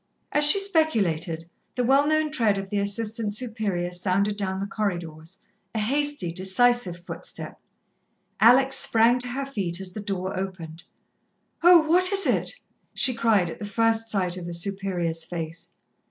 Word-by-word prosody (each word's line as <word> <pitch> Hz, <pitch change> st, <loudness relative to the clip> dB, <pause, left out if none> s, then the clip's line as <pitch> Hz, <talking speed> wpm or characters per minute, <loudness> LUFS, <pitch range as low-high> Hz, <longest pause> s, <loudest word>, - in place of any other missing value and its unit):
As 295 Hz, 0 st, +6 dB
she 350 Hz, -, +8 dB
speculated, 205 Hz, -, 0 dB, 0.3 s
the 250 Hz, -, -1 dB
well 275 Hz, +4 st, +3 dB
known 310 Hz, 0 st, 0 dB
tread 225 Hz, -9 st, +1 dB
of 195 Hz, 0 st, -7 dB
the 205 Hz, -, -1 dB
Assistant 210 Hz, +1 st, -2 dB
Superior 215 Hz, -7 st, -3 dB
sounded 195 Hz, +3 st, -1 dB
down 190 Hz, -2 st, -3 dB
the 195 Hz, -, -3 dB
corridors 175 Hz, -5 st, -5 dB, 0.4 s
a -, -, 0 dB
hasty, 285 Hz, -4 st, -1 dB
decisive 190 Hz, +2 st, +1 dB
footstep. 175 Hz, -, -9 dB, 0.8 s
Alex 265 Hz, +4 st, +5 dB
sprang 235 Hz, 0 st, +3 dB
to 250 Hz, -, 0 dB
her 270 Hz, +3 st, -4 dB
feet 190 Hz, -10 st, -4 dB
as 190 Hz, -1 st, -4 dB
the 215 Hz, -, -7 dB
door 195 Hz, -2 st, -4 dB
opened. 180 Hz, -4 st, -7 dB, 0.8 s
"Oh, 350 Hz, 0 st, +7 dB
what 365 Hz, +3 st, +5 dB
is 395 Hz, 0 st, +4 dB
it?" -, -, 0 dB, 0.4 s
she 255 Hz, -, +4 dB
cried, 215 Hz, -7 st, +1 dB
at -, -, -10 dB
the -, -, -7 dB
first 225 Hz, +2 st, 0 dB
sight 185 Hz, -4 st, -2 dB
of 175 Hz, -1 st, -7 dB
the 175 Hz, -, -4 dB
Superior's 175 Hz, -3 st, -3 dB
face. 165 Hz, 0 st, -7 dB
205 Hz, 155 wpm, -24 LUFS, 180-245 Hz, 0.8 s, she